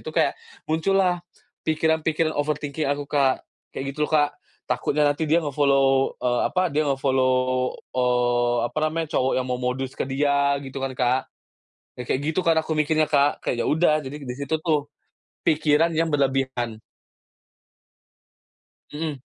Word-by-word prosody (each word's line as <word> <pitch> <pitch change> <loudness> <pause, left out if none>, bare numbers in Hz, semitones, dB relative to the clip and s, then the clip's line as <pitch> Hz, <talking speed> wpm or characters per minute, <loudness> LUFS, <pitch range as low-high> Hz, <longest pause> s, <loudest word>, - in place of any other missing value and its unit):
situ - - -4
kayak - - +2 0.3
muncullah 180 +3 +2 0.5
pikiran-pikiran 160 0 +1
overthinking 150 0 -2
aku 145 0 -2
Kak 140 -3 +2 0.3
kayak 135 - -4
gitu 150 0 0
loh - - -11
Kak 145 -1 +4 0.4
takutnya 150 +1 +1
nanti 145 +2 +1
dia 165 +2 +3
nge-follow, 135 -2 +2
eee, 120 -1 +1
apa 185 -2 0
dia 150 +1 +1
nge-follow, 130 -1 +2 0.6
eee, 120 -1 +2
apa - - -4
namanya 160 +1 -2
cowok 130 +1 +1
yang 130 - 0
mau 125 -1 -2
modus 130 +1 -2
ke - - -3
dia 140 +1 +2
gitu 135 0 -6
kan 135 0 -2
Kak, 125 +1 +2 0.8
ya - - -3
kayak 130 - +1
gitu 175 - +1
kan 165 -1 +4
aku 160 - -4
mikirnya 155 +1 +2
Kak 145 -1 +2
kayak 120 - -1
ya - - -1
udah 155 0 +3
jadi 145 +1 -8
di 125 -2 -5
situ 140 +3 -1
tuh, 150 -3 0 0.6
pikiran 155 +1 +3
yang 165 +1 +1
berlebihan. 130 -5 -1 2.1
Mhm. 150 -2 -4
145 Hz, 150 wpm, -24 LUFS, 130-155 Hz, 2.1 s, Kak